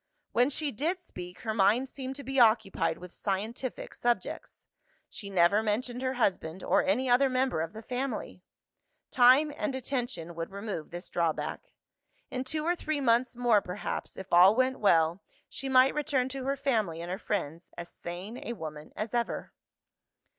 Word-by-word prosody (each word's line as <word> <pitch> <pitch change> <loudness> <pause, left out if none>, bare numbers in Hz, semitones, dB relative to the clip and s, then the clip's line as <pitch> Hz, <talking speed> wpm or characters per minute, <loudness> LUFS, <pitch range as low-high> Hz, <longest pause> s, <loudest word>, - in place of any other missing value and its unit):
When 245 +3 +3
she 295 0 -1
did 320 - -1
speak, 180 - -10
her 220 -3 -2
mind 215 +5 +3
seemed 265 0 -6
to 280 - -8
be 270 0 -1
occupied 215 -8 +3
with 180 -1 -11
scientific 220 +6 -3
subjects: 240 0 -2 0.5
she 200 - -7
never 190 +2 +4
mentioned 240 +3 -1
her 260 0 0
husband, 190 -7 -1
or - - +3
any 245 +8 +1
other 255 +2 +4
member 255 -8 +1
of 165 +3 -4
the 220 +1 -9
family. 255 +3 -4 0.7
Time 265 +4 +6
and 300 -3 -2
attention 240 -10 -3
would 165 0 -5
remove 200 -5 -5
this 175 +2 -7
drawback. 170 - -2 0.6
In 255 - -2
two 305 +4 -3
or 350 +1 +2
three 310 -3 -2
months 240 -1 +2
more 240 -4 +3
perhaps, 180 +3 -5
if 190 -1 -8
all 185 +4 +8
went 255 +1 +1
well, 170 -2 +3 0.3
she 270 - -5
might 260 0 +6
return 285 -4 0
to 265 0 -5
her 275 +1 +1
family 225 -12 0
and 170 +1 -5
her 190 - -3
friends, 170 -6 -3
as 170 - -6
sane 185 +7 -7
a 235 - -4
woman 155 -6 -8
as 215 +2 -4
ever. 240 -1 -2
235 Hz, 170 wpm, -29 LUFS, 185-260 Hz, 0.7 s, all